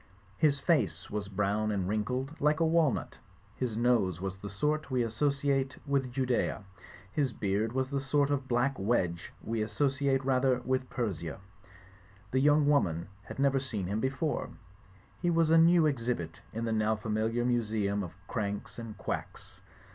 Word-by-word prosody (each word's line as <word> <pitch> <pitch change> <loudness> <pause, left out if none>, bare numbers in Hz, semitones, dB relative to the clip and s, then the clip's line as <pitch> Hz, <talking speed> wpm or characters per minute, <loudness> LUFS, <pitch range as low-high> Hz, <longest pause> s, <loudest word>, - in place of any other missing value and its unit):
His 145 -3 +3
face 165 +1 +1
was 105 -1 -3
brown 105 +2 0
and 95 -3 -1
wrin 105 +1 +1
kled 130 +7 -4
like 150 +2 +3
a 165 - +3
walnut, 160 -5 +1 0.4
his 120 -4 -2
nose 115 -8 +2
was 95 0 -3
of - - -22
the 100 - -5
sort 150 +9 -1
we 125 -3 +1
asso 115 +6 +1
ciate 140 -1 0
with 140 -3 0
Judaea, 125 -4 0 0.5
his 135 +2 0
beard 105 +3 0
was 130 +1 -1
the 140 - 0
sort 140 +1 +1
of 140 -2 -1
black 125 +1 +1
wedge 95 -5 0
we 115 0 -2
associate 135 +4 +1
rather 130 -1 +3
with 130 +1 -1
Per3ia. 90 -10 -3 0.9
The 130 - +2
young 145 +1 +4
woman 90 - +2 0.2
had - - -8
never 135 0 +3
seen 115 -8 -3
him 100 +4 -1
before; 135 +5 -1 0.7
he 175 - +2
was 165 -1 +3
a 165 - +7
new 165 0 +6
exhibit 115 - -2
in 115 +1 -3
the 115 - -1
now 110 0 +2
familiar 110 +2 -1
museum 110 -4 0
of 90 -3 -6
Cranks 105 -1 -3
and 115 -2 -7
quacks. - - -6
125 Hz, 170 wpm, -30 LUFS, 105-140 Hz, 0.9 s, a